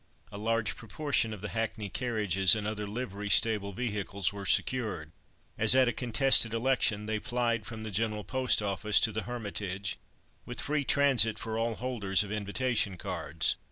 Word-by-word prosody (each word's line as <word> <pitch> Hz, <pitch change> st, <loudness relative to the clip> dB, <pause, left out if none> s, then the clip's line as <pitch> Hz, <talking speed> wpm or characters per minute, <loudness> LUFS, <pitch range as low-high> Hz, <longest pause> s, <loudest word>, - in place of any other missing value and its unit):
A 100 Hz, -, -8 dB
large 115 Hz, -1 st, -1 dB
proportion 120 Hz, +1 st, -1 dB
of 105 Hz, -3 st, -7 dB
the 105 Hz, -, -4 dB
hackney 110 Hz, -2 st, -3 dB
carriages 105 Hz, -4 st, +3 dB
and 105 Hz, -1 st, -4 dB
other 105 Hz, -1 st, -4 dB
livery 105 Hz, -2 st, -5 dB
stable 105 Hz, -2 st, +3 dB
vehicles 100 Hz, -3 st, -2 dB
were 100 Hz, -1 st, -6 dB
secured. 105 Hz, -12 st, 0 dB, 0.5 s
As 110 Hz, +3 st, +6 dB
at 130 Hz, -1 st, +5 dB
a 120 Hz, -, 0 dB
contested 125 Hz, -2 st, +3 dB
election, 115 Hz, -4 st, +1 dB
they 110 Hz, 0 st, -2 dB
plied 115 Hz, -2 st, -1 dB
from 110 Hz, -2 st, -7 dB
the 110 Hz, -, -6 dB
General 105 Hz, +1 st, -1 dB
Post 130 Hz, -3 st, +1 dB
Office 100 Hz, +1 st, +2 dB
to 110 Hz, -, +3 dB
the 110 Hz, +1 st, -5 dB
Hermitage, 100 Hz, -4 st, -4 dB, 0.4 s
with 120 Hz, -, -6 dB
free 145 Hz, -1 st, -1 dB
transit 135 Hz, -6 st, +3 dB
for 110 Hz, -1 st, -5 dB
all 115 Hz, 0 st, -1 dB
holders 105 Hz, -6 st, +1 dB
of 100 Hz, -, -8 dB
invitation 105 Hz, -1 st, -1 dB
cards. -, -, -2 dB
110 Hz, 165 wpm, -29 LUFS, 105-120 Hz, 0.5 s, As